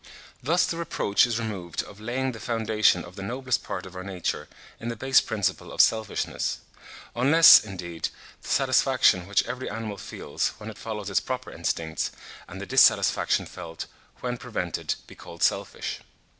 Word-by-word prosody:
Thus 165 Hz, +8 st, +2 dB
the 165 Hz, -, -3 dB
reproach 125 Hz, -9 st, +2 dB
is 115 Hz, -2 st, -1 dB
removed 100 Hz, -7 st, -4 dB
of 105 Hz, 0 st, -13 dB
laying 130 Hz, +4 st, -2 dB
the 115 Hz, -, -9 dB
foundation 110 Hz, -5 st, +2 dB
of 85 Hz, +1 st, -13 dB
the 95 Hz, -, -7 dB
noblest 125 Hz, +5 st, -2 dB
part -, -, -5 dB
of 95 Hz, 0 st, -11 dB
our 95 Hz, -, -6 dB
nature 95 Hz, -3 st, -3 dB, 0.3 s
in 115 Hz, -, -6 dB
the 115 Hz, -, -3 dB
base 135 Hz, +4 st, +4 dB
principle 110 Hz, -4 st, -2 dB
of -, -, -10 dB
selfishness; 110 Hz, -1 st, +1 dB, 0.6 s
unless, 145 Hz, +7 st, +8 dB
indeed, 90 Hz, -5 st, -5 dB, 0.3 s
the -, -, -12 dB
satisfaction 90 Hz, -1 st, +3 dB
which 100 Hz, -, +2 dB
every 130 Hz, +1 st, -4 dB
animal 110 Hz, -1 st, -5 dB
feels, -, -, -3 dB
when 110 Hz, +1 st, -7 dB
it -, -, -14 dB
follows 105 Hz, -2 st, -5 dB
its 100 Hz, -, +3 dB
proper 130 Hz, 0 st, -5 dB
instincts, 80 Hz, -1 st, -2 dB, 0.4 s
and -, -, -9 dB
the -, -, -5 dB
dissatisfaction -, -, +4 dB
felt 85 Hz, -2 st, -8 dB, 0.4 s
when 125 Hz, -1 st, -2 dB
prevented, 100 Hz, -9 st, -3 dB
be -, -, -14 dB
called -, -, -8 dB
selfish. -, -, -1 dB
110 Hz, 165 wpm, -26 LUFS, 95-125 Hz, 0.6 s, unless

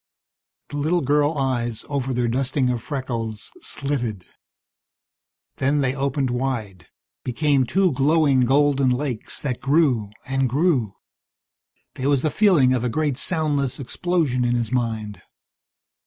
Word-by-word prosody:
The 145 Hz, -, -5 dB
little 160 Hz, +4 st, +1 dB
girl 145 Hz, +2 st, +2 dB
eyes 120 Hz, -4 st, -1 dB
over 135 Hz, -2 st, -2 dB
their 125 Hz, -1 st, 0 dB
dusting 130 Hz, +1 st, 0 dB
of 120 Hz, -2 st, -2 dB
freckles 115 Hz, -6 st, -5 dB
slitted. 120 Hz, -, -3 dB, 1.3 s
Then 140 Hz, +2 st, +1 dB
they 130 Hz, -1 st, +1 dB
opened 135 Hz, -1 st, -1 dB
wide, 120 Hz, -7 st, -3 dB, 0.4 s
became 135 Hz, 0 st, +1 dB
two 190 Hz, +3 st, +2 dB
glowing 140 Hz, 0 st, +3 dB
golden 135 Hz, +1 st, +3 dB
lakes 125 Hz, -2 st, -2 dB
that 130 Hz, -4 st, -3 dB
grew, 135 Hz, -8 st, +2 dB, 0.2 s
and 135 Hz, -1 st, 0 dB
grew 130 Hz, -, +1 dB, 1.0 s
There 135 Hz, +2 st, -2 dB
was 140 Hz, -2 st, +2 dB
the 155 Hz, -, +1 dB
feeling 170 Hz, -12 st, +4 dB
of 125 Hz, -2 st, 0 dB
a 125 Hz, -, 0 dB
great 150 Hz, +2 st, 0 dB
soundless 145 Hz, -6 st, -1 dB
explosion 140 Hz, -2 st, 0 dB
in 120 Hz, 0 st, +1 dB
his 120 Hz, -2 st, -2 dB
mind. 110 Hz, -4 st, -2 dB
135 Hz, 130 wpm, -23 LUFS, 120-145 Hz, 1.3 s, feeling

